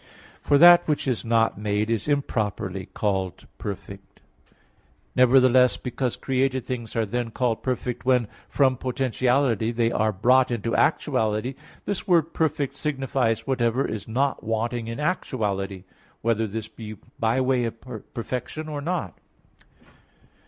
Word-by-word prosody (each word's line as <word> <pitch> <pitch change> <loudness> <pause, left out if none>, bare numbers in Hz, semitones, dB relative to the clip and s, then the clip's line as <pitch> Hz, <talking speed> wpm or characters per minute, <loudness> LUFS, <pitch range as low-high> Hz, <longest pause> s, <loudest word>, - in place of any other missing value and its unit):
For 145 - +3
that 175 +2 +8
which 150 -2 0
is 125 -4 0
not 115 -2 +2
made 105 +1 0
is 115 +2 -1
improperly 105 -9 -1
called 95 -3 -2
perfect. 100 0 -8 1.0
Nevertheless 125 0 +5
because 125 0 -3
created 130 -1 0
things 120 -3 -5
are 115 -1 +1
then 120 +2 -2
called 115 -1 -1
perfect, 125 -1 -3
when 125 -3 +2 0.2
from 130 -3 +2
potentiality 125 -2 +1
they 115 -1 +1
are 110 -1 +1
brought 125 +6 +3
into 115 -1 -2
actuality, 110 +4 +1 0.3
this 200 -2 -3
word 165 -3 +3
"perfect" 150 -3 0
signifies 135 -6 -1
whatever 125 -1 +1
is 110 - -5
not 135 +5 0
wanting 115 +1 -2
in 115 +3 -5
actuality, 100 - -2 0.4
whether 115 -1 +1
this 110 +1 -5
be 110 -1 -9 0.2
by 115 +3 +2
way 130 -2 +2
of 115 0 -5 0.4
perfection 125 +6 -4
or 150 -2 -4
not. 160 - -3
120 Hz, 130 wpm, -25 LUFS, 110-135 Hz, 1.0 s, that